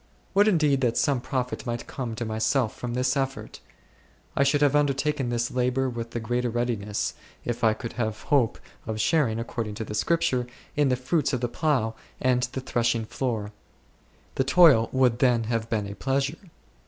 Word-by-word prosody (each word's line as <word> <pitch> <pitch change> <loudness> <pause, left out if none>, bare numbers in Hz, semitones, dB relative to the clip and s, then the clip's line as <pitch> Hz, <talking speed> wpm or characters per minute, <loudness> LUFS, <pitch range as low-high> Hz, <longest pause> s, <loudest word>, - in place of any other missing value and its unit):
Would 205 +2 +5
indeed 150 -8 +3
that 120 -2 +1
some 135 -4 +2
profit 125 -1 -3
might 120 0 -3
come 120 -4 -5
to 120 - -3
myself 110 +2 0
from 120 -1 -4
this 125 +1 +1
effort! 135 -1 -3 0.8
I - - +2
should 140 +1 +3
have 145 0 +3
undertaken 145 -2 +1
this 120 0 -1
labour 125 +1 0
with 115 -1 -5
the 120 - -4
greater 120 +2 -1
readi 120 +1 0
ness, 105 0 -2 0.3
if 120 0 -3
I 110 -1 +4
could 115 +1 -6
have 110 -1 -2
hope 130 -6 +2 0.3
of 110 -1 -3
sharing, 125 -3 +2
according 115 -2 -4
to 110 - -4
the 105 - -6
Scripture, 125 0 +1 0.3
in 145 -2 +3
the 125 - +3
fruits 135 +3 0
of 125 - -1
the 120 - 0
plough 125 -5 0 0.3
and 125 -1 +2
the 130 - -3
threshing 120 -3 0
floor; 110 -4 -3 0.8
the 135 - +1
toil 135 -5 +6
would 125 -3 +2
then 125 -3 +3
have 115 0 -2
been 105 -3 0
a 100 - -6
pleasure. 140 - -2
125 Hz, 185 wpm, -26 LUFS, 115-135 Hz, 0.8 s, toil